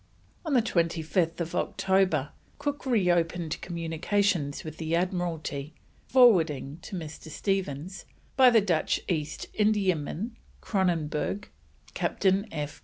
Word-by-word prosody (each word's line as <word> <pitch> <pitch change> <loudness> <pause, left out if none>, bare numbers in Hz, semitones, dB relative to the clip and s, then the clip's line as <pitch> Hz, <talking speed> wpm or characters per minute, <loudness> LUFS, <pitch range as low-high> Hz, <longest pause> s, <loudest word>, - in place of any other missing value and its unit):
On 315 -4 -2
25th 170 -5 0
October 185 -7 +1 0.3
Cook 290 -1 -3
reopened 175 -7 +1
communication 170 0 0
with 155 0 -7
the 160 0 -1
Admiralty, 170 -5 -2 0.3
forwarding 165 - +4
to 190 - -7
Mr. 160 -2 -7
Stephens, 185 0 -3 0.3
by 260 -2 +8
the 230 -2 +5
Dutch 175 -6 +1
East 155 -4 -2
Indiaman 205 -1 +1 0.3
Kronenberg, 180 -1 -1 0.4
Captain 195 +2 +1
F. 150 -2 -5
175 Hz, 100 wpm, -28 LUFS, 155-200 Hz, 0.4 s, by